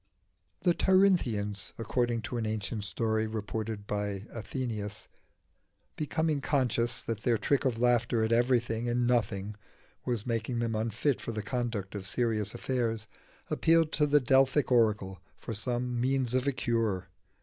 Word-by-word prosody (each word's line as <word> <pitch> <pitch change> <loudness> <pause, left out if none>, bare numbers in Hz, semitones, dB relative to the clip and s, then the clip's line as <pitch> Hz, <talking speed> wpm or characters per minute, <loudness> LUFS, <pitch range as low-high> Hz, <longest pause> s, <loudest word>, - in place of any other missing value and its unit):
The 175 - +4
Tirynthians, 120 - +2
according 120 0 0
to 120 +2 -4
an 110 - -2
ancient 110 0 -3
story 110 +1 0
reported 110 -1 -4
by 105 -1 -2
Athenaeus, 110 -3 -4 0.9
becoming 155 -1 0
conscious 125 -4 0
that 115 -2 -3
their 120 -1 +2
trick 140 +5 +1
of 125 -3 +1
laughter 120 -1 +2
at 110 - 0
everything 120 -1 +2
and 120 +1 +1
nothing 105 -4 0 0.5
was 120 -4 -2
making 115 0 -1
them 115 -1 0
unfit 115 +5 0
for 115 - -4
the 110 -1 -3
conduct 115 -5 -3
of 100 -2 -6
serious 110 -2 0
affairs, 115 -4 -1 0.5
appealed 165 -1 +3
to 150 0 +2
the 150 0 +5
Delphic 135 +1 +3
oracle 105 -6 +2 0.2
for 115 - -6
some 120 +2 -1
means 130 -1 +1
of 130 +1 +1
cure. 115 -7 0
115 Hz, 140 wpm, -30 LUFS, 110-125 Hz, 0.9 s, the